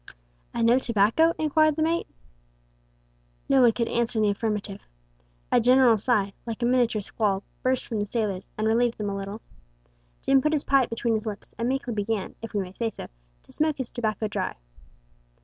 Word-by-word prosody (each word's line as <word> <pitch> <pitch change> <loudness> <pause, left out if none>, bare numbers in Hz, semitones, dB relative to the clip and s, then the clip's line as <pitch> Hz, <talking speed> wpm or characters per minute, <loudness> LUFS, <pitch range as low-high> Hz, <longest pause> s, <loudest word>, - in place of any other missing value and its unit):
"And 230 -1 0
no 240 +3 +5
tobacco?" 235 +8 +3
inquired 310 0 +3
the 315 - 0
mate. 335 +1 0 1.4
No 270 -1 +4
one 240 -2 +6
could 235 +1 -2
answer 235 0 -1
in 215 - +3
the 205 - +3
affirmative. 205 -1 -3 0.7
A 245 - +4
general 250 0 +5
sigh 205 -2 0
like 230 0 -5
a - - +3
miniature 240 -4 +2
squall 200 -1 -1 0.2
burst 255 0 0
from 225 -3 -3
the 205 - -2
sailors, 205 -4 -2
and 215 - -1
relieved 230 +2 +2
them 205 -2 -3
a - - -3
little. 200 +3 -6 0.8
Jim 270 0 +4
put 305 +3 +1
his 295 - +1
pipe 270 -3 +3
between 230 0 -1
his 220 0 -2
lips, 210 -1 -5
and 235 +1 0
meekly 260 -2 -2
began, 210 -1 -2
if 225 -1 -8
we 205 - +2
may 185 -1 -7
say 230 +2 -2
so, - - -9 0.3
to - - -20
smoke 310 -1 0
his 260 -3 -5
tobacco 215 -2 -2
dry. 205 -3 -3
230 Hz, 190 wpm, -26 LUFS, 210-255 Hz, 1.4 s, one